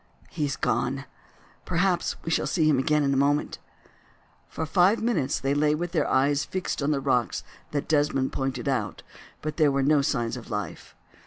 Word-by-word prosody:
he 150 - -1
is 140 - -2
gone. 135 +2 -1 0.6
Perhaps 175 +1 0
we 165 - -3
shall - - +1
see 160 -4 +2
him 145 -4 +4
again 150 +2 +2
in 140 -1 +2
a - - +1
moment." 145 +2 +1 0.9
For 160 - -3
five 180 +7 +3
minutes 210 - 0
they 135 +1 0
lay 150 +1 +2
with 175 +2 -3
their 165 - 0
eyes 140 +2 +2
fixed 185 -3 -3
on 140 - 0
the 145 -2 +1
rocks 125 -4 0 0.3
that 145 -1 -3
Desmond 145 -3 +1
pointed 135 -2 -2
out, 110 -8 -2 0.4
but 155 0 -4
there 155 -3 +4
were 135 0 +1
no 145 +1 +4
signs 120 -3 -1
of 120 - -10
life. 105 -3 -5
145 Hz, 185 wpm, -26 LUFS, 135-155 Hz, 0.9 s, him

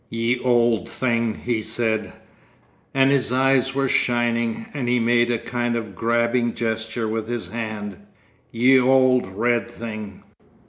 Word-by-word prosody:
'Ye 115 +2 -1
auld 120 -5 +2
thing,' 115 -3 -1
he 120 -2 -1
said—and 110 +4 -3
his 135 -3 +1
eyes 135 0 +2
were 135 0 +1
shining, 120 -2 0
and 130 -5 -3
he 125 0 +2
made 120 +1 +2
a 120 - +1
kind 120 +1 -2
of 110 -4 -4
grabbing 120 +1 0
gesture 110 0 -2
with 110 0 -3
his 120 -1 -4
hand; 110 -4 -5 0.5
'ye 130 +3 +4
auld 130 -2 +3
red 120 +5 0
thing.... 110 -4 -8
120 Hz, 135 wpm, -22 LUFS, 110-125 Hz, 0.5 s, ye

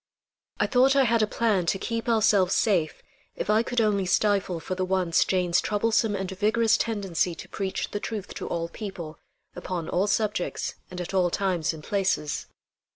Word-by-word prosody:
I - - +3
thought 265 +1 +4
I 275 - +5
had 230 -2 +2
a 215 - +2
plan 210 -6 +1
to 195 - +2
keep 230 +4 -3
ourselves 210 -5 +3
safe 175 -8 +1 0.3
if - - -1
I 215 +1 +4
could 245 +1 -1
only 205 -4 +2
stifle 195 -2 +1
for 175 +4 -4
the 185 0 -2
once 185 -3 +2
Jane's 180 -2 +1
troublesome 220 0 +1
and 190 -1 -3
vigorous 215 +4 +2
tendency 195 -6 -1
to - - -10
preach 195 -1 -3
the 205 - -2
truth 210 -2 -5
to - - -6
all 170 0 -2
people, 170 -5 -7 0.4
upon 175 -2 -4
all 190 +3 +1
subjects 210 -3 -1 0.2
and 180 - -7
at 175 +2 -5
all 185 -2 +3
times 180 -3 0
and 160 -2 -10
places. 190 -7 -1
195 Hz, 180 wpm, -26 LUFS, 180-215 Hz, 0.4 s, I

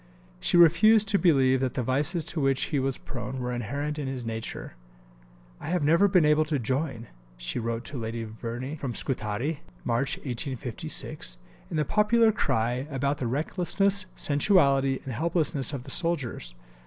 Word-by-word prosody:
She 175 - +2
refused 205 +6 +6
to 200 -2 +3
believe 135 -7 +4
that 130 -1 -2
the 125 - -1
vices 150 +7 0
to 170 -2 -3
which 135 -1 +2
he 145 - +3
was 135 0 -1
prone 125 0 -6
were 125 0 -3
inherent 140 +6 -3
in 140 - -3
his 130 -3 -4
nature. 115 - -5 0.9
"I - - -8
have 180 -3 0
never 165 +7 +5
been 180 -5 +4
able 150 +1 +4
to 155 -1 -1
join," 130 0 -2 0.3
she - - -4
wrote 115 +1 -3
to 140 - -5
Lady 115 0 -4
Verney 115 +5 -6
from 130 -5 -4
Scutari 125 +5 -2 0.2
(March 135 +4 0
1856), 125 - -4 0.3
"in - - -3
the 150 - +1
popular 220 - +4
cry 125 - -1
about 140 +1 -1
the 125 - -1
recklessness, 185 - 0
sensuality, 140 -4 +3
and 130 - -4
helplessness 155 0 0
of 135 -4 -5
the 135 - -6
soldiers. 135 - 0
135 Hz, 165 wpm, -27 LUFS, 120-160 Hz, 0.9 s, refused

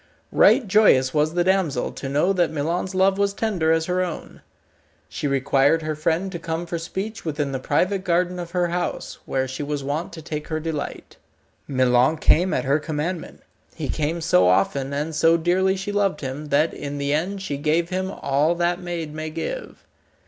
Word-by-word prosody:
Right 245 - +5
joyous 185 -11 +4
was 155 +2 +1
the 175 - +3
damsel 185 -5 +1
to 135 - -6
know 150 +8 +2
that 175 -3 +2
Milon's 170 +5 -2
love 190 +1 +3
was 200 0 +1
tender 185 -9 0
as 160 0 +2
her 180 +1 0
own. 175 -3 -7 0.7
She - - -3
required 140 +3 +2
her 155 0 -2
friend 165 +5 -1
to 170 - -5
come 165 +1 -3
for 170 0 -4
speech 195 +6 -5
within 150 -3 -2
the 135 - -2
private 185 +8 0
garden 180 0 0
of 175 -1 -5
her 175 -1 0
house, 175 +1 -3
where 130 -1 0
she 130 +2 -6
was 145 -1 -3
wont 145 +5 -3
to 165 - -8
take 150 0 -5
her 155 -1 -2
delight. 155 -2 -5 0.5
Milon 130 +2 +3
came 175 +4 +3
at - - -1
her 140 +3 +2
commandment. 160 +3 -4 0.3
He - - -4
came 160 +3 -1
so 90 - +4
often, 115 +9 +2
and 150 +3 -2
so 165 +2 +4
dearly 185 +3 +2
she 195 +2 -4
loved 200 -5 0
him, 140 +2 -5
that 150 +3 +2
in 145 0 -5
the 140 0 -1
end 190 +6 -2
she 145 -7 -3
gave 160 +4 +1
him 185 0 -2
all 150 -1 +1
that 175 +1 0
maid 170 -4 -4
may 155 0 -4
give. 165 - -6
160 Hz, 190 wpm, -23 LUFS, 145-180 Hz, 0.7 s, Right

